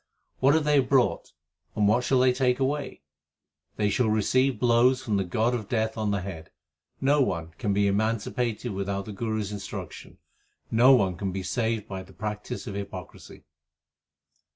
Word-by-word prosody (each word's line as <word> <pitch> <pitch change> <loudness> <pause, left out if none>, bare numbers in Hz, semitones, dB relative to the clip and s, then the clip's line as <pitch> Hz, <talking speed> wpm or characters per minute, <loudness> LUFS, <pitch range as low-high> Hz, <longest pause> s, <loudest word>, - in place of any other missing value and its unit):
What 135 +3 +4
have 160 - +2
they 150 -1 +4
brought, 130 -1 +1 0.4
and 105 -1 +2
what 115 +4 +3
shall 130 +2 +2
they 130 -1 +4
take 125 0 +1
away? 140 - -2 0.7
They 105 -1 0
shall 115 +1 +1
receive 125 +3 +2
blows 125 +2 +3
from 105 -4 0
the 95 - +1
god 110 +7 0
of 110 -4 -4
death 110 -2 0
on 110 -2 -1
the 100 -2 0
head. 90 -4 -8 0.5
No 145 +2 +3
one 85 -9 -1
can 105 - -1
be 100 +1 +2
emancipated 110 +3 -1
without 100 0 -3
the 105 - -7
Guru 110 +1 -2
s 100 0 -5
instruction. 100 -2 -8 0.5
No 120 +4 +6
one 95 -7 +1
can 95 0 -3
be 95 0 -4
saved 115 -1 -1
by 95 -1 -5
the 95 - -15
practice 105 0 -5
of 100 - -6
hypocrisy. 100 0 -8
110 Hz, 175 wpm, -26 LUFS, 100-125 Hz, 0.7 s, No